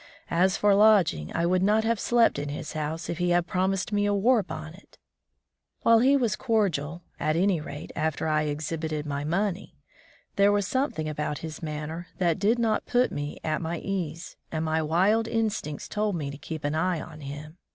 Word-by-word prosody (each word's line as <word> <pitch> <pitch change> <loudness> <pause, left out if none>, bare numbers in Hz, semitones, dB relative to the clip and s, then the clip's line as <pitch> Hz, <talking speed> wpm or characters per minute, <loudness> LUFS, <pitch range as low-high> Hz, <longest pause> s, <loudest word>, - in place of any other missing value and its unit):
As 185 +3 +3
for 205 -1 +4
lodging, 195 - +4
I 170 - +1
would 180 +1 +2
not 210 +3 +3
have 230 -1 +1
slept 235 -10 +3
in 145 0 -4
his 145 +1 -5
house 155 +1 -3
if 170 - -4
he 175 0 +1
had 175 0 +3
promised 185 +3 -1
me 205 0 +2
a 205 - +2
war 230 +4 +4
bonnet! 160 +1 -9 0.9
While 230 0 +6
he 270 +4 +5
was 235 -5 +1
cordial 175 - 0
— - - -38
at 155 - +1
any 180 -1 +2
rate, 145 -1 -8
after 160 0 -1
I 155 0 +1
exhibited 155 +1 -3
my 140 -1 -3
money 185 +4 -2 0.3
— - - -31
there 200 +1 +5
was 205 -1 +1
something 260 - -1
about 150 -1 -2
his 155 -1 -7
manner 155 +2 -5
that 170 -2 +1
did 215 +5 +3
not 225 -2 0
put 250 +1 +2
me 145 0 -4
at 155 -1 -1
my 170 +1 -2
ease, 175 -3 -4
and 160 0 -2
my 160 0 +1
wild 190 +8 +2
instincts 215 -10 -2
told 210 -2 -1
me 145 -4 -3
to 140 - -8
keep 160 +1 -6
an 145 +1 0
eye 175 +1 0
on 155 -1 -9
him. 145 +4 -8
170 Hz, 200 wpm, -27 LUFS, 155-205 Hz, 0.9 s, While